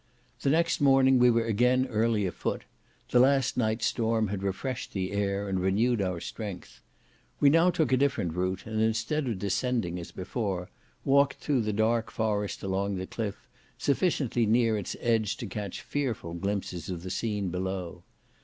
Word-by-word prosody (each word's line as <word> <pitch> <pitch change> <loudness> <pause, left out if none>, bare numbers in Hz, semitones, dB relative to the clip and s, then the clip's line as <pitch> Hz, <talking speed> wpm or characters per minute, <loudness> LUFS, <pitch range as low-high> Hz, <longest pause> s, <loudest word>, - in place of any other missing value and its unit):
The 140 - +1
next 165 +2 +2
morning 135 -2 +5
we 125 0 +6
were 115 -1 +2
again 125 +4 +3
early 110 -3 +1
a 90 - -1
foot; - - -3 0.5
the 125 - +5
last 135 0 +3
night's 110 -1 0
storm 110 -2 +1
had 100 -1 -3
refreshed 100 +7 -3
the 95 -2 -2
air, 100 0 -1
and 95 -1 -1
renewed 105 +5 +2
our 90 -3 -1
strength. 100 +1 -7 0.6
We 140 - +6
now 165 +3 +5
took 165 -5 +1
a 130 - +4
different 120 - 0
route, 95 +1 -2
and 110 0 -2
instead 115 +7 0
of 115 -5 -1
descending, 100 -1 -1
as 85 - -8
before, 95 -2 -3 0.3
walked 140 0 +4
through 140 -4 0
the 105 -1 -1
dark 110 +2 +1
forest 105 -2 -2
along 100 +1 -1
the 95 0 -3
cliff, 105 0 -5 0.3
sufficiently 140 - +1
near 115 0 +3
its 100 -3 -4
edge 110 -4 +1
to - - -5
catch 100 -1 -5
fearful 120 -12 -3
glimpses 95 -2 -3
of 90 -2 -5
the 95 - -5
scene 105 -3 -1
below. 90 -1 -4
110 Hz, 170 wpm, -28 LUFS, 95-125 Hz, 0.6 s, we